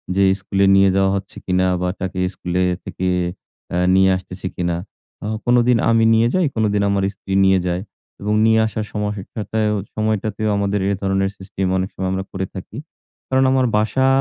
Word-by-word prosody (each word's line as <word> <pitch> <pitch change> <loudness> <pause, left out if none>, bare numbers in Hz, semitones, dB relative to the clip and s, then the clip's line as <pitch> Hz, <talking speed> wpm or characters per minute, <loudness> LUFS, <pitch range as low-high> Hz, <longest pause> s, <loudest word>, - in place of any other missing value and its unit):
যে 100 - +3 0.2
স্কুলে 100 0 +1
নিয়ে 95 0 +5
যাওয়া 95 0 +3
হচ্ছে 95 0 -6
কিনা? 95 0 +2
বা 90 - 0
তাকে 95 0 -3
স্কুলে 90 +1 -2 0.2
থেকে 95 - -4 0.7
এহ 90 0 +2
নিয়ে 95 0 +5
আসতেছে 95 0 -7
কিনা? 85 -1 -1 0.5
ও - - -2 0.2
কোনোদিন 120 0 +4
আমি 115 0 +4
নিয়ে 115 +1 +4
যাই 185 -3 +3
কোনোদিন 105 -2 +1
আমার 100 -1 +1
স্ত্রী 95 0 -6
নিয়ে 95 -1 +4
যায় 90 +1 -1 0.4
এবং 105 +1 -1
নিয়ে 110 0 +4
আসার 110 -1 -3
সমহ 105 -1 -2 0.2
টাটায়ও 105 0 -1 0.2
সময়টাতেও 110 0 -1
আমাদের 100 0 0
এই 100 - +1
ধরনের 95 0 +1
সিস্টেম 95 0 -4
অনেক 95 +2 -1
সময় 95 0 -2
আমরা 95 0 -2
করে 95 0 -3
থাকি। 95 +5 -8 0.5
কারণ 130 0 +3
আমার 130 -1 +3
বাসা 130 +5 +1
100 Hz, 175 wpm, -20 LUFS, 95-110 Hz, 0.7 s, নিয়ে